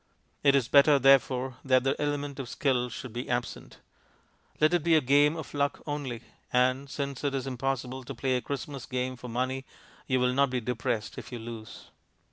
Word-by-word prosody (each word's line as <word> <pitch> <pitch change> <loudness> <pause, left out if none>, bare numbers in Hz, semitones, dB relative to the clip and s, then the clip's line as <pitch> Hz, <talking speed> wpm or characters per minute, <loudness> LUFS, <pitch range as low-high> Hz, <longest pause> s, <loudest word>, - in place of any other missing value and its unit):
It 140 -1 +5
is 130 -4 +2
better, 145 +2 +6
therefore, 130 -1 +3
that 130 -2 +3
the 135 +1 +1
element 145 -1 -2
of 130 -3 -5
skill 125 -3 0
should 125 -1 -8
be 120 +1 -5
absent. 120 0 -3 0.8
Let 155 +2 +4
it 175 -3 +2
be 165 -1 +4
a - - +6
game 145 +3 +4
of 160 - -7
luck 140 0 0
only; 145 -6 -4 0.3
and, 130 +2 +2
since 140 -1 -4
it 140 -1 0
is 135 - -2
impossible 130 0 -3
to 135 - -7
play 130 +2 0
a 125 - 0
Christmas 140 -1 -5
game 130 0 -2
for 125 0 -9
money, 130 +2 -2 0.4
you 130 -1 +2
will 125 0 +2
not 140 +1 +3
be 125 0 -1
depressed 115 -2 -3
if - - -11
you 125 - -4
lose. 115 -2 -9
130 Hz, 195 wpm, -28 LUFS, 125-140 Hz, 0.8 s, better